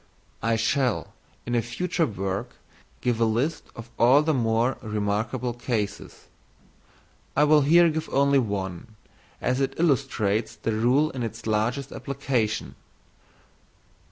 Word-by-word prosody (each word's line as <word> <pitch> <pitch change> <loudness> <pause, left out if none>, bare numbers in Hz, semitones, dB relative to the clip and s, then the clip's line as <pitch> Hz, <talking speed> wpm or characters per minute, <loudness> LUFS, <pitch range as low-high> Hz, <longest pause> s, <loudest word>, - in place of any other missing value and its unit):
I 115 +2 +1
shall, 125 +1 0 0.3
in 120 - -3
a 120 - +3
future 165 - -1
work, 100 -2 -4 0.5
give 120 -2 0
a - - +5
list 120 +9 -1
of 115 0 -10
all 130 +5 +6
the 160 0 +1
more 115 0 +1
remarkable 110 +4 -2
cases. 115 -4 -4 1.1
I 145 - +6
will 150 0 +5
here 170 +5 +6
give 160 0 -2
only 140 0 +3
one, 100 -1 -4 0.5
as 130 +2 0
it 135 - -1
illustrates 120 -9 +1
the 115 - -3
rule 125 +8 +2
in 130 - -5
its 115 0 -5
largest 115 +6 -1
application. 130 -6 -2
120 Hz, 130 wpm, -25 LUFS, 110-140 Hz, 1.1 s, all